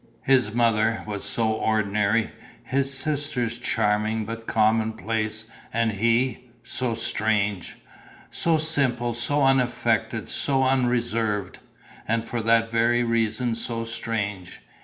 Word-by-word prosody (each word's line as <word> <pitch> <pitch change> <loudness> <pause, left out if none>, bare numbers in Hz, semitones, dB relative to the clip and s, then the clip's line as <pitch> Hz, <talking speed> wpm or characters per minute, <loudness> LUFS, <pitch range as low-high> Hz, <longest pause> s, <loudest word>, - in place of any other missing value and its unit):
His 130 -5 +3
mother 115 -1 +1
was 105 -2 -4
so 110 -1 0
ordinary, 110 0 +1 0.3
his 135 +1 0
sisters 135 -4 -1
charming 110 -2 0
but 115 +1 -7
commonplace 110 0 0 0.3
and 115 0 +1
he... 115 +4 0
so 120 0 -2
strange! 105 -4 -1 0.6
So 165 -1 +2
simple, 135 -7 +1
so 140 +5 +1
unaffected, 130 -2 +1
so 135 -2 +1
unreserved; 120 -6 0 0.5
and 115 +1 0
for 120 0 -3
that 115 0 +2
very 120 +1 +2
reason 115 0 0
so 115 0 -3
strange. 105 -5 -4
115 Hz, 110 wpm, -24 LUFS, 110-120 Hz, 0.6 s, His